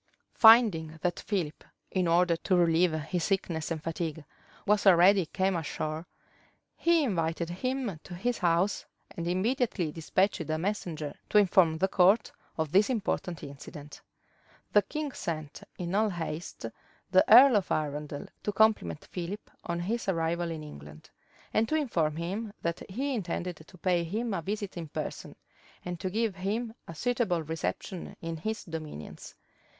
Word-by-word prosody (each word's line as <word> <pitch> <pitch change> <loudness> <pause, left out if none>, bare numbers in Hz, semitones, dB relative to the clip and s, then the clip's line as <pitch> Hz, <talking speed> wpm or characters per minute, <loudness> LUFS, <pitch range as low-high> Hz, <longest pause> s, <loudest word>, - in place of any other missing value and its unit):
Finding 210 -9 +6
that 175 -1 0
Philip, 175 -7 -3 0.3
in 185 -2 +1
order 170 +1 +4
to 185 +3 0
relieve 170 0 +4
his 160 +3 -2
sickness 170 -5 -1
and 160 -2 -3
fatigue, 160 -2 -4 0.4
was 210 0 +3
already 185 0 +6
come 190 +2 0
ashore, 155 0 -3 0.7
he 335 -2 +3
invited 170 - -1
him 250 -2 -2
to 175 - -8
his 240 +7 -1
house; 175 +3 +2 0.3
and 170 0 -5
immediately 190 - 0
despatched 185 +5 0
a 155 - +1
messenger 165 -5 -3 0.2
to - - +3
inform 180 -5 +5
the 190 - +2
court 195 +4 +4 0.3
of 160 -2 -1
this 200 +6 +4
important 190 - -2
incident. 145 +1 -10 0.7
The 205 - +7
king 300 +5 -4
sent 155 - -5 0.2
in 175 0 -4
all 215 +2 +3
haste 165 - -5 0.5
the 185 0 +6
earl 250 +2 +10
of 200 -3 +1
Arundel 150 -1 -2 0.2
to 210 - -1
compliment 205 - +2
Philip 185 +4 -6
on 170 0 -2
his 215 +3 -2
arrival 170 -1 0
in 160 -2 -5
England, 75 - -12 0.4
and 220 +1 +2
to 310 - +1
inform 170 - 0
him 195 +7 -3
that 170 0 -2
he 270 +8 -2
intended 180 -5 -3
to 160 +4 -16
pay 175 -1 +1
him 220 +6 -2
a 170 - -1
visit 200 +2 -4
in 165 -2 -5
person, - - -6 0.5
and 175 -1 -4
to 185 - -2
give 215 0 -1
him 220 +5 -2
a 165 - -8
suitable 195 -4 0
reception 165 +3 -4
in 165 0 -5
his 220 +7 -3
dominions. 155 - -8
180 Hz, 155 wpm, -29 LUFS, 160-210 Hz, 0.7 s, earl